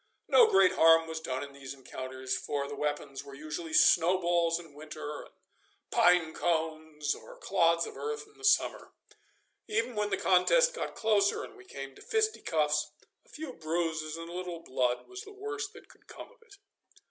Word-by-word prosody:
No 475 Hz, -2 st, +7 dB
great 190 Hz, -1 st, +5 dB
harm 165 Hz, 0 st, +5 dB
was 160 Hz, 0 st, -4 dB
done 130 Hz, -4 st, -3 dB
in 140 Hz, 0 st, -9 dB
these 140 Hz, 0 st, -8 dB
encounters, 130 Hz, 0 st, -5 dB
for 140 Hz, +1 st, -3 dB
the 145 Hz, -, -7 dB
weapons 145 Hz, -2 st, -3 dB
were 140 Hz, -1 st, -11 dB
usually 155 Hz, +3 st, -6 dB
snowballs 170 Hz, 0 st, +4 dB
in 165 Hz, -4 st, -13 dB
winter 150 Hz, 0 st, -7 dB
and -, -, -20 dB, 0.6 s
pine 175 Hz, -3 st, +4 dB
cones 160 Hz, -3 st, -1 dB
or -, -, -12 dB
clods 170 Hz, -3 st, +2 dB
of -, -, -9 dB
earth 445 Hz, -1 st, -4 dB
in 425 Hz, 0 st, -23 dB
the -, -, -18 dB
summer. 405 Hz, -, +2 dB, 0.7 s
Even 230 Hz, +3 st, -1 dB
when 210 Hz, -1 st, -1 dB
the -, -, 0 dB
contest -, -, +4 dB
got 485 Hz, -, -5 dB
closer 210 Hz, -2 st, +2 dB
and -, -, -10 dB
we 380 Hz, -1 st, -15 dB
came 135 Hz, -, -8 dB
to -, -, -16 dB
fisticuffs, 155 Hz, -, 0 dB, 0.3 s
a -, -, -27 dB
few 300 Hz, -4 st, -7 dB
bruises 160 Hz, -2 st, -2 dB
and 165 Hz, 0 st, -7 dB
a 170 Hz, -, -9 dB
little 175 Hz, -2 st, -5 dB
blood 125 Hz, -3 st, -1 dB
was 380 Hz, +1 st, -8 dB
the 410 Hz, -2 st, -11 dB
worst 415 Hz, 0 st, -5 dB
that -, -, -14 dB
could -, -, -22 dB
come -, -, -11 dB
of -, -, -25 dB
it. 460 Hz, -3 st, -17 dB
165 Hz, 180 wpm, -30 LUFS, 150-220 Hz, 0.7 s, No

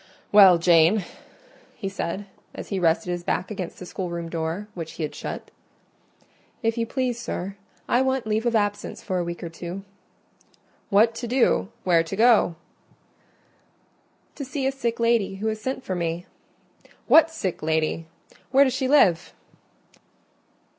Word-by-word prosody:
"Well, 195 Hz, -4 st, +8 dB
Jane?" 170 Hz, +3 st, +4 dB, 0.7 s
he 195 Hz, -, -5 dB
said, 195 Hz, 0 st, -4 dB, 0.3 s
as -, -, -8 dB
he 195 Hz, -, -1 dB
rested 170 Hz, +1 st, +1 dB
his 175 Hz, 0 st, -3 dB
back 180 Hz, +3 st, -2 dB
against 190 Hz, -4 st, -5 dB
the 180 Hz, -, -8 dB
schoolroom 170 Hz, -2 st, -5 dB
door, 165 Hz, +5 st, -3 dB
which 165 Hz, -4 st, -7 dB
he 165 Hz, -, -5 dB
had 150 Hz, -, -3 dB
shut. -, -, -7 dB, 1.1 s
"If 225 Hz, 0 st, +1 dB
you 230 Hz, -1 st, -1 dB
please, 250 Hz, -2 st, -2 dB
sir, 195 Hz, -4 st, -5 dB, 0.3 s
I 245 Hz, -, +3 dB
want 265 Hz, -2 st, 0 dB
leave 220 Hz, +2 st, 0 dB
of 235 Hz, -, +1 dB
absence 205 Hz, -1 st, -1 dB
for 185 Hz, -3 st, -1 dB
a -, -, 0 dB
week 170 Hz, +1 st, -6 dB
or 170 Hz, -, -4 dB
two." 175 Hz, +3 st, -7 dB, 1.1 s
"What 220 Hz, +3 st, +4 dB
to 240 Hz, +1 st, -5 dB
do?—where 205 Hz, -8 st, +2 dB
to 165 Hz, +4 st, -5 dB
go?" 220 Hz, -5 st, +4 dB, 1.8 s
"To 290 Hz, -, -6 dB
see 270 Hz, 0 st, -3 dB
a 270 Hz, -, +2 dB
sick 235 Hz, -4 st, -3 dB
lady 230 Hz, -4 st, +2 dB
who 200 Hz, +3 st, -6 dB
has 215 Hz, 0 st, -4 dB
sent 260 Hz, +2 st, -3 dB
for 190 Hz, -, -3 dB
me." 170 Hz, 0 st, -2 dB, 0.8 s
"What 325 Hz, 0 st, +6 dB
sick 195 Hz, -, -4 dB
lady?—where 160 Hz, -, 0 dB
does 260 Hz, -3 st, +1 dB
she 260 Hz, +1 st, -1 dB
live?" 190 Hz, -, +3 dB
195 Hz, 150 wpm, -24 LUFS, 170-235 Hz, 1.8 s, Well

